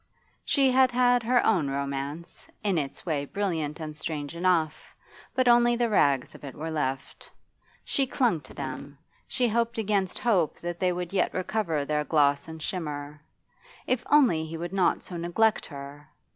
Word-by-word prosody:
She 270 -2 +3
had 260 0 +5
had 245 0 +4
her 245 +2 +2
own 175 -10 +2
romance, 140 +3 -4 0.2
in 195 -5 +2
its 140 -2 -5
way 150 -5 -1
brilliant 160 -5 -2
and 155 -1 -6
strange 155 -1 -5
enough, 170 -3 0 0.4
but 255 -1 +2
only 240 0 +5
the 235 -1 +1
rags 140 -9 +2
of - - -14
it 140 -2 -8
were 160 +2 -5
left. 135 -3 -3 0.6
She 275 -2 0
clung 240 - +1
to 130 - -14
them, 140 +1 -6 0.3
she 250 -2 +1
hoped 230 +1 0
against 200 -4 0
hope 190 -10 +1
that 175 0 -4
they 185 -1 +2
would 180 0 -4
yet 195 - +2
recover 180 -6 -1
their 150 0 0
gloss 145 -2 +2
and 160 -1 -8
shimmer. 150 -4 -5 0.6
If 250 -1 0
only 255 - +5
he 160 +1 -6
would 175 +2 -5
not 190 -2 +2
so 175 - -7
neglect 175 +6 +1
her! 145 0 -10
170 Hz, 170 wpm, -27 LUFS, 145-220 Hz, 0.6 s, had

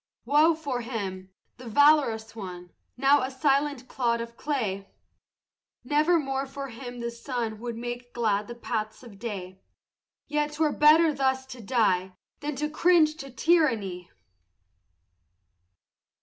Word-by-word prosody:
Woe 300 +5 +4
for 280 -6 -3
him, 195 -6 -5 0.3
the 250 0 -11
valorous 235 -5 +3
one, 180 -4 -8 0.3
Now 275 +2 +4
a 260 - -2
silent 275 -1 0
clod 235 -3 0
of 235 0 -6
clay! 215 -10 -3 0.9
Nevermore 290 -1 +1
for 275 0 -6
him 245 0 -8
the 235 0 -3
sun 235 -2 -4
Would 235 0 -5
make 240 +1 -6
glad 210 -3 0
the 240 - -7
paths 220 -1 -4
of 210 -5 -13
day; 190 -4 -6 0.6
Yet 295 0 -1
'twere 305 0 +1
better 310 +2 +5
thus 265 -1 0
to 255 -2 -10
die 190 -5 +1 0.2
Than 295 0 -4
to 300 +2 -1
cringe 310 0 +3
to 275 -3 -8
tyranny! 230 - +1
250 Hz, 130 wpm, -27 LUFS, 220-290 Hz, 0.9 s, better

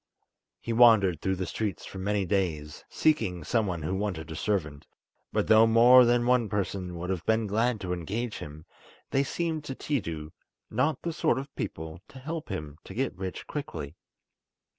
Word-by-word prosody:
He 115 - -3
wandered 110 -8 +5
through 95 0 0
the 95 0 -3
streets 105 -4 -3
for 95 - -8
many 100 +1 0
days, 85 -6 -2
seeking 110 - +1
some 110 +4 +1
one 85 -4 -3
who 75 - -2
wanted 95 -6 -3
a - - -5
servant; 80 -6 -2 0.4
but - - +1
though 110 +1 +6
more 120 +3 +8
than 120 0 +3
one 125 -3 +3
person 95 -3 -3
would 90 +2 -3
have 90 -4 -3
been 110 0 +2
glad 110 +3 +1
to 90 -1 -2
engage 105 +7 -3
him, 75 +2 -9 0.5
they 135 - +3
seemed 160 +1 -2
to 135 - -5
Tiidu 85 - -3 0.4
not 135 +2 0
the 170 - -2
sort 120 - +1
of 140 +1 -6
people 80 +1 -5
to - - -14
help 155 +3 -5
him 75 -6 -6
to 95 - -10
get 130 -3 -1
rich 95 0 -5
quickly. 80 - -6
100 Hz, 180 wpm, -28 LUFS, 85-120 Hz, 0.5 s, more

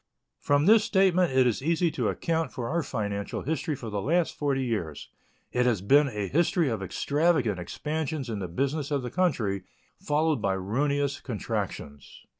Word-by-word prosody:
From 145 +1 +2
this 220 +2 +6
statement 185 -5 +3
it 130 -1 +4
is 120 -1 +1
easy 165 +3 +1
to - - -1
account 165 -1 -1
for 120 -4 -4
our 170 +6 0
financial 105 -7 -3
history 160 +1 -2
for 115 -4 -7
the 100 -1 -2
last 165 - +1
forty 140 -2 0
years. 95 - -3 0.4
It 125 0 +2
has 115 -5 +2
been 140 +9 +5
a 105 -6 -3
history 165 - +2
of 110 -4 -2
extravagant 140 - +1
expansions 150 - -3
in 110 -3 -3
the 95 - -3
business 140 - -2
of 140 -3 -1
the 125 - -5
country, 120 - 0 0.4
followed 150 -3 +1
by 100 -2 +1
ruinous 140 +9 -1
contractions. 75 - -5
140 Hz, 170 wpm, -27 LUFS, 105-160 Hz, 0.4 s, this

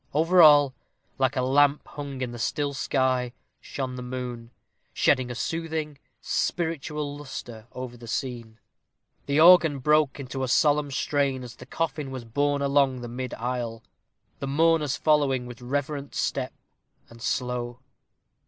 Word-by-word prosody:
Over 170 +4 +5
all, 145 -4 +7 0.5
like 135 +1 +2
a 130 - 0
lamp 145 +2 +3
hung 140 -2 -7
in 125 -2 -2
the 120 - -8
still 145 +5 -1
sky, 130 -2 0 0.3
shone 130 -2 -5
the - - -5
moon, 125 -2 -6 0.4
shedding 125 -1 +2
a 125 - -5
soothing, 155 +1 -3 0.2
spiritual 150 -3 -2
lustre 120 -5 -8
over 125 -1 -7
the 120 0 -12
scene. 120 -2 -4 0.7
The 140 +1 +2
organ 165 -3 +7
broke 150 +1 +2
into 135 0 -5
a 130 - 0
solemn 150 +1 +3
strain 140 -1 0
as 120 -2 -9
the - - -13
coffin 155 -4 -3
was 130 -3 -7
borne 145 +4 0
along 140 -2 +2
the 120 - -6
mid 125 +1 -5
aisle 120 -1 -4 0.6
the 140 - -4
mourners 155 0 +2
following, 140 -5 +2
with 120 0 -10
reverent 140 +2 -3
step, - - -1 0.5
and 115 0 -15
slow. 125 -1 -2
135 Hz, 145 wpm, -26 LUFS, 125-145 Hz, 0.7 s, all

